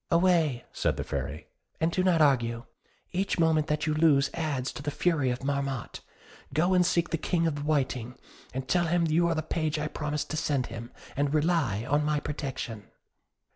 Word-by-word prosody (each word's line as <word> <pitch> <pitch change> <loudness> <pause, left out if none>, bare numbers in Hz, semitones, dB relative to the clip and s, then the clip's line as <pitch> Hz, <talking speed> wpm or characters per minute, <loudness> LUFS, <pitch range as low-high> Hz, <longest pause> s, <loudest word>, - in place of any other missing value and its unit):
"Away," 170 -7 +3
said - - 0
the - - -2
Fairy, - - -4 0.3
"and 160 +1 +2
do 185 - +1
not 175 -4 +4
argue; 120 -5 +2 0.5
each 190 +2 -1
moment 160 -2 +3
that 150 -1 0
you 155 - +1
lose 150 -3 +4
adds 145 -6 -2
to - - -8
the 145 - -2
fury 145 -3 +1
of 125 +1 -3
Marmotte. 140 -3 -2 0.6
Go 175 +5 +3
and 180 -1 +5
seek 175 -1 +1
the 165 - 0
King 170 0 +1
of 165 - +1
the 145 - -5
Whiting; 130 -5 -1 0.5
tell 175 +5 +2
him 170 +1 +2
you 165 +2 +3
are 170 - +1
the 155 - -1
page 155 0 -1
I 150 0 -1
promised 150 -1 -3
to 155 - -2
send 140 -4 0
him, 115 +1 -7 0.2
and 145 +2 +1
rely 150 - +1
on 145 +2 +2
my 150 0 +1
protection." 135 -7 -5
150 Hz, 190 wpm, -28 LUFS, 140-165 Hz, 0.6 s, and